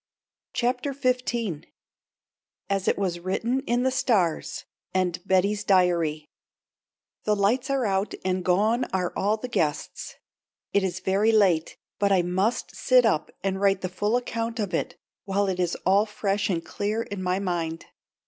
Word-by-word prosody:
CHAPTER 255 Hz, +3 st, 0 dB
XV 245 Hz, -, -1 dB, 1.1 s
"AS 195 Hz, -1 st, 0 dB
IT -, -, +2 dB
WAS 180 Hz, -3 st, -1 dB
WRITTEN 225 Hz, +8 st, -1 dB
IN 240 Hz, +1 st, +1 dB
THE 260 Hz, -, +2 dB
STARS" 195 Hz, -11 st, 0 dB, 0.3 s
AND 180 Hz, -2 st, +1 dB
BETTY'S 200 Hz, +2 st, +2 dB
DIARY 170 Hz, -6 st, +2 dB, 1.0 s
"THE 210 Hz, -, +3 dB
lights 235 Hz, +7 st, +1 dB
are 270 Hz, -3 st, +1 dB
out 195 Hz, 0 st, 0 dB
and 185 Hz, -1 st, 0 dB
gone 215 Hz, +7 st, +2 dB
are 180 Hz, -2 st, -2 dB
all 210 Hz, +2 st, +1 dB
the 250 Hz, -, -5 dB
guests." 155 Hz, -11 st, -2 dB, 0.6 s
It 200 Hz, -, +3 dB
is 185 Hz, 0 st, -2 dB
very 200 Hz, +4 st, +2 dB
late, 190 Hz, -7 st, +3 dB, 0.2 s
but 200 Hz, -1 st, +2 dB
I 185 Hz, -2 st, +4 dB
must 190 Hz, +6 st, -1 dB
sit 255 Hz, -2 st, +4 dB
up 155 Hz, -9 st, +1 dB
and 195 Hz, 0 st, -1 dB
write 195 Hz, -1 st, +3 dB
the 185 Hz, -, -2 dB
full 205 Hz, +6 st, 0 dB
account 230 Hz, -1 st, -3 dB
of 205 Hz, -4 st, -2 dB
it -, -, -2 dB, 0.3 s
while 200 Hz, +1 st, +1 dB
it 185 Hz, -1 st, -2 dB
is 175 Hz, -1 st, 0 dB
all 200 Hz, +3 st, +4 dB
fresh 205 Hz, 0 st, -1 dB
and 170 Hz, -3 st, -1 dB
clear 215 Hz, +3 st, -2 dB
in 200 Hz, -3 st, -6 dB
my 180 Hz, 0 st, 0 dB
mind. 170 Hz, -4 st, -2 dB
200 Hz, 160 wpm, -26 LUFS, 180-225 Hz, 1.1 s, I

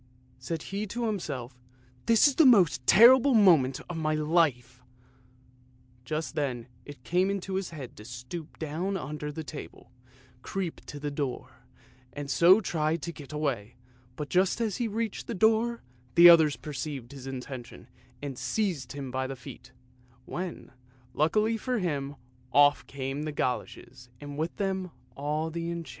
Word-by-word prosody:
Said 160 Hz, +5 st, -4 dB
he 200 Hz, +2 st, -4 dB
to 235 Hz, +4 st, -3 dB
himself, 135 Hz, -, -4 dB, 0.2 s
" 125 Hz, 0 st, -31 dB
This 230 Hz, +4 st, +6 dB
is 285 Hz, -, +1 dB
the 320 Hz, -, +5 dB
most 180 Hz, -, +4 dB
terrible 255 Hz, +5 st, +7 dB
moment 160 Hz, -11 st, +5 dB
of 175 Hz, -, -5 dB
my 155 Hz, -1 st, 0 dB
life! 150 Hz, -6 st, +1 dB, 0.6 s
" 125 Hz, 0 st, -31 dB
Just 155 Hz, +4 st, -3 dB
then 130 Hz, -6 st, -2 dB, 0.2 s
it 145 Hz, -3 st, -11 dB
came 180 Hz, +8 st, +1 dB
into 195 Hz, -1 st, -3 dB
his 190 Hz, -1 st, -2 dB
head 145 Hz, -7 st, -9 dB
to 105 Hz, -, -10 dB
stoop 125 Hz, +7 st, -8 dB
down 170 Hz, +6 st, -2 dB
under 150 Hz, -1 st, -5 dB
the 160 Hz, +2 st, -6 dB
table, 130 Hz, -, -10 dB, 0.5 s
creep 185 Hz, +2 st, -4 dB
to 145 Hz, -, -7 dB
the 145 Hz, 0 st, -3 dB
door, 140 Hz, -3 st, -4 dB, 0.6 s
and 145 Hz, 0 st, -5 dB
so 180 Hz, +4 st, +6 dB
try 160 Hz, -6 st, 0 dB
to 170 Hz, +1 st, -5 dB
get 145 Hz, -3 st, -11 dB
away, 135 Hz, -8 st, -3 dB, 0.4 s
but 150 Hz, +2 st, -5 dB
just 185 Hz, +7 st, +2 dB
as 220 Hz, -4 st, -1 dB
he 240 Hz, -, -1 dB
reached 220 Hz, 0 st, -3 dB
the 230 Hz, -, -3 dB
door 225 Hz, +3 st, +2 dB, 0.3 s
the 170 Hz, +1 st, +10 dB
others 160 Hz, -4 st, +7 dB
perceived 140 Hz, -4 st, -6 dB
his 135 Hz, -2 st, -9 dB
intention 125 Hz, -2 st, -8 dB, 0.4 s
and 135 Hz, -3 st, -5 dB
seized 170 Hz, -, -2 dB
him 140 Hz, -2 st, -6 dB
by 130 Hz, +1 st, -2 dB
the 135 Hz, -, -5 dB
feet, 125 Hz, 0 st, -12 dB, 0.5 s
when, 180 Hz, 0 st, -6 dB, 0.4 s
luckily 215 Hz, +9 st, +2 dB
for 250 Hz, +3 st, -2 dB
him, 145 Hz, -7 st, -2 dB, 0.4 s
off 145 Hz, 0 st, +4 dB
came 135 Hz, +1 st, -4 dB
the 155 Hz, 0 st, -3 dB
goloshes, 125 Hz, -2 st, -4 dB
and 145 Hz, 0 st, -8 dB
with 160 Hz, +3 st, -3 dB
them 190 Hz, -2 st, -2 dB, 0.3 s
all 150 Hz, +3 st, -2 dB
the 165 Hz, +1 st, -4 dB
enchantment. 170 Hz, -3 st, -5 dB
150 Hz, 160 wpm, -28 LUFS, 135-185 Hz, 0.6 s, the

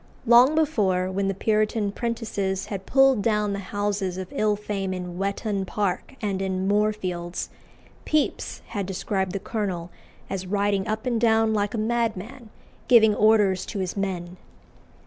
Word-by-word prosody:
Long 245 Hz, +6 st, +6 dB
before, 195 Hz, -13 st, +1 dB
when 195 Hz, +1 st, -1 dB
the 195 Hz, -, -1 dB
Puritan 215 Hz, 0 st, +1 dB
prentices 205 Hz, -4 st, -2 dB
had 195 Hz, -1 st, -6 dB
pulled 270 Hz, -4 st, +4 dB
down 210 Hz, -1 st, +1 dB
the 200 Hz, -, -3 dB
houses 205 Hz, -3 st, -1 dB
of 185 Hz, -1 st, -5 dB
ill 215 Hz, -1 st, +2 dB
fame 200 Hz, -2 st, -3 dB
in 180 Hz, -1 st, -6 dB
Whettone 200 Hz, 0 st, -1 dB
Park 200 Hz, +4 st, -2 dB
and 195 Hz, -2 st, -1 dB
in 190 Hz, 0 st, -1 dB
Moorfields, 195 Hz, -4 st, -1 dB, 0.5 s
Pepys 305 Hz, -1 st, -1 dB
had 200 Hz, -4 st, -3 dB
described 190 Hz, 0 st, -2 dB
the 195 Hz, -, -2 dB
colonel 185 Hz, -6 st, -3 dB, 0.4 s
as 190 Hz, -1 st, -4 dB
riding 200 Hz, 0 st, 0 dB
up 215 Hz, +2 st, -2 dB
and 235 Hz, -3 st, 0 dB
down 225 Hz, -1 st, +3 dB
like 205 Hz, +1 st, 0 dB
a -, -, -2 dB
madman, 230 Hz, +1 st, -2 dB, 0.4 s
giving 220 Hz, -3 st, +6 dB
orders 205 Hz, -3 st, +3 dB
to 210 Hz, -, -5 dB
his 185 Hz, -2 st, -2 dB
men. 185 Hz, -3 st, -3 dB
205 Hz, 150 wpm, -25 LUFS, 190-220 Hz, 0.5 s, Long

